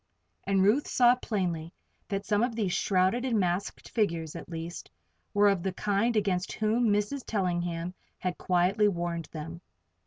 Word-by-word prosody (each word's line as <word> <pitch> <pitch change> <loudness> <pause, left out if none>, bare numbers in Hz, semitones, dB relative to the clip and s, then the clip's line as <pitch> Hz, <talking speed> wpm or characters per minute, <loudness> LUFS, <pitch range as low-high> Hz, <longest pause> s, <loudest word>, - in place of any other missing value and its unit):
And 195 -1 +3
Ruth 225 +9 +3
saw 245 -1 +5
plainly 180 -9 -2 0.4
that 195 0 -3
some 210 0 +2
of 240 -1 0
these 205 -6 0
shrouded 190 +5 +2
and 240 -5 +1
masked 180 +1 -1
figures, 165 -8 -1
at - - -8
least, 165 +1 -6 0.4
were 205 0 +4
of 195 -3 +2
the 190 +1 -2
kind 210 +4 +1
against 195 -3 0
whom 220 +2 +1
Mrs. 210 +6 0
Tellingham 175 -3 -1 0.2
had 180 -1 -3
quietly 185 +4 +3
warned 170 -3 -2
them. 160 +2 -8
195 Hz, 155 wpm, -29 LUFS, 175-215 Hz, 0.4 s, saw